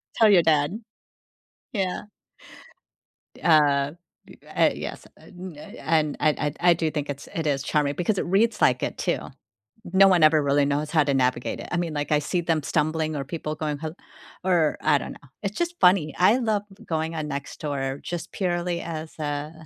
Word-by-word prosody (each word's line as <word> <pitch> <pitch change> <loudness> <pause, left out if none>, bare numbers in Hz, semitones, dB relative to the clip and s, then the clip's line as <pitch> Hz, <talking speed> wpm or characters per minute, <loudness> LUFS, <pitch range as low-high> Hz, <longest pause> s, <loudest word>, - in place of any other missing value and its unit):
Tell 225 -2 +5
your 185 -4 +6
dad. 155 +5 +2 0.9
Yeah. 190 -4 -1 1.3
D - - -16
uh, 145 -4 +4 0.4
d - - -14 0.2
uh, - - +5
yes, - - -7
and, 180 -3 -11
uh, - - -10
y - - -10
and 155 -2 +1
I 155 - +4
I 150 - 0
d 150 - -12
I 175 0 +5
do 160 -2 -1
think 150 -2 -3
it's 140 0 -6
it 160 -2 -1
is 140 -2 0
charming 145 -1 0
because 190 +5 0
it - - -1
reads 210 +5 +2
like 125 0 +3
it, - - -3
too. - - 0 0.7
No 195 +1 +7
one 180 -4 +4
ever 155 -1 +5
really 140 0 +3
knows 145 +2 -1
how 155 -2 +3
to 140 -1 0
navigate 125 -2 0
it. - - -8
I - - -1
mean, 170 -2 -2
like, 145 0 -3
I 150 - +4
see 160 +4 -1
them 165 -2 0
stumbling 155 +1 0
or 145 - -2
people 155 +1 -4
going 150 -1 -3
ho 155 +1 -5 0.5
or 175 -5 +2
I 150 -2 +4
don't - - -7
know, 145 - -16 0.2
it's 200 +1 -3
just 345 0 -2
funny. 180 -5 +4
I 205 +7 +5
love 220 -4 0 0.2
going 160 0 -2
on 155 -2 -3
Nextdoor 140 -1 -4
just 175 -2 -5
purely 175 -2 -1
as 160 -1 -6
a 145 +1 -3
155 Hz, 200 wpm, -25 LUFS, 145-175 Hz, 1.3 s, No